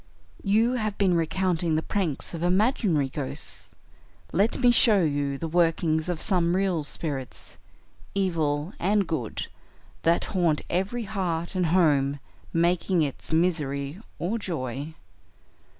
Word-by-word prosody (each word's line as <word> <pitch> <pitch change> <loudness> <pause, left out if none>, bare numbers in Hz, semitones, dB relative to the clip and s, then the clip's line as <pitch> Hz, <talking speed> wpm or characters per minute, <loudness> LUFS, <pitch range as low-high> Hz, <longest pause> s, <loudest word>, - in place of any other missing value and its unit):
"You 220 +4 +3
have 215 -5 -2
been 190 -3 +3
recounting 170 0 0
the 160 - 0
pranks 180 -8 -2
of 165 - -5
imaginary 180 - +2
ghosts; 135 0 -6 0.6
let 200 +6 +2
me 245 -1 +5
show 215 -5 +5
you 145 -2 0
the 165 - -4
workings 165 -1 +1
of 175 -3 -2
some 175 -3 +2
real 185 -5 +1
spirits, 140 -3 -5 0.6
evil 165 -4 0
and 200 +2 +2
good, 130 -10 -3 0.6
that 170 +1 +2
haunt 170 -5 +2
every 195 +7 -1
heart 180 -5 -2
and 180 -2 +1
home, 145 -5 +3 0.3
making 170 +1 +2
its 140 +2 -5
misery 155 -2 0 0.2
or 210 +7 -2
joy. 145 - -4
170 Hz, 125 wpm, -26 LUFS, 155-190 Hz, 0.6 s, me